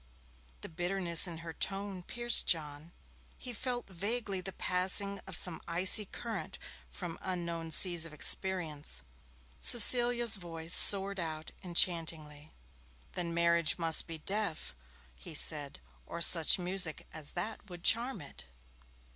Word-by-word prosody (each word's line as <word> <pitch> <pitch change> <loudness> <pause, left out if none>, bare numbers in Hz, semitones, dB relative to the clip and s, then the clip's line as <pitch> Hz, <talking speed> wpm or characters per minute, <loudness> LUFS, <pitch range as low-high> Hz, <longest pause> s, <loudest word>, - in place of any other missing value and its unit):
The - - -9
bitterness 175 +1 +3
in 170 -2 -8
her 165 - -9
tone 195 +1 -5
pierced 240 +6 +2
John. 150 0 -4 0.5
He 250 - -7
felt 245 +2 -5
vaguely 200 +1 -4
the 195 - -9
passing 190 +2 -1
of 190 -4 -2
some 180 -3 -2
icy 185 +5 +5
current 230 +3 -9 0.3
from 175 -3 -10
unknown 170 -3 -7
seas 175 0 +6
of - - -16
experience. 155 - -3 0.6
Cecilia's 240 -1 +5
voice 165 -2 -1
soared 200 0 +5
out 160 -2 -7
enchantingly. 160 -4 -4 0.6
'Then, 175 -1 -5
marriage 170 -1 0
must 165 -2 0
be 165 -1 -8
deaf,' 195 - -5 0.4
he 105 - -11
said, 145 -2 +2 0.3
'or - - -9
such 165 -1 +4
music 180 -3 -1
as 155 -2 -1
that 210 +3 -7
would 175 -1 -11
charm 235 -1 -1
it.' 145 - -13
175 Hz, 130 wpm, -29 LUFS, 165-200 Hz, 0.6 s, seas